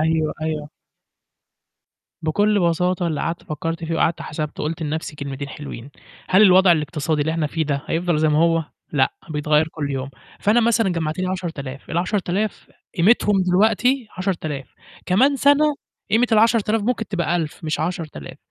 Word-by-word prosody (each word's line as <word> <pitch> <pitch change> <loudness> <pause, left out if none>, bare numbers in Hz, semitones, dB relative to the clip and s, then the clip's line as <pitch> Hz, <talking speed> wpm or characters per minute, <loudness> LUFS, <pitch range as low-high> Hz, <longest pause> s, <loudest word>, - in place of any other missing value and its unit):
أيوه، 160 0 +1
أيوه. 155 -2 -3 1.5
بكل 205 +6 +2
بساطة 180 +1 +1
اللي 155 -3 -2
قعدت 165 +1 -3
فكّرت 165 0 -4
فيه 165 0 -2
وقعدت 165 +1 +1
حسبته، 150 0 -5
قُلت 160 +2 -3
لنَفْسي 155 0 -4
كلمتين 140 0 -5
حلوين، 140 -3 -8 0.4
هل 190 +3 +5
الوضع 185 -2 +7
الاقتصادي 150 -1 -1
اللي 155 +2 0
إحنا 160 -2 0
فيه 160 +2 -2
ده 140 -2 -2
هيفضل 170 -1 0
زي 155 0 +3
ما 150 0 +2
هو 165 0 +3 0.3
لأ، 135 -3 +2 0.2
بيتغيّر 150 +1 +2
كل 150 -3 -4
يوم، 135 0 -3 0.3
فأنا 215 +4 +3
مثلًا 225 -2 +2
جمّعت 160 -3 -2
لي 185 - 0
10000، 160 -8 -5
ال10000 190 +3 -1 0.3
قيمتهم 200 +1 +4
دلوقتي 220 +7 +2
10000، 160 -8 -3 0.3
كمان 260 +10 +3
سَنة 285 +2 +4 0.4
قيمة 225 +4 +4
ال10000 225 -1 +3
ممكن 225 -1 -1
تبقى 175 -3 0
1000 160 -1 -4
مش 155 -1 -1
10000، 160 - -5
165 Hz, 150 wpm, -21 LUFS, 155-195 Hz, 1.5 s, الوضع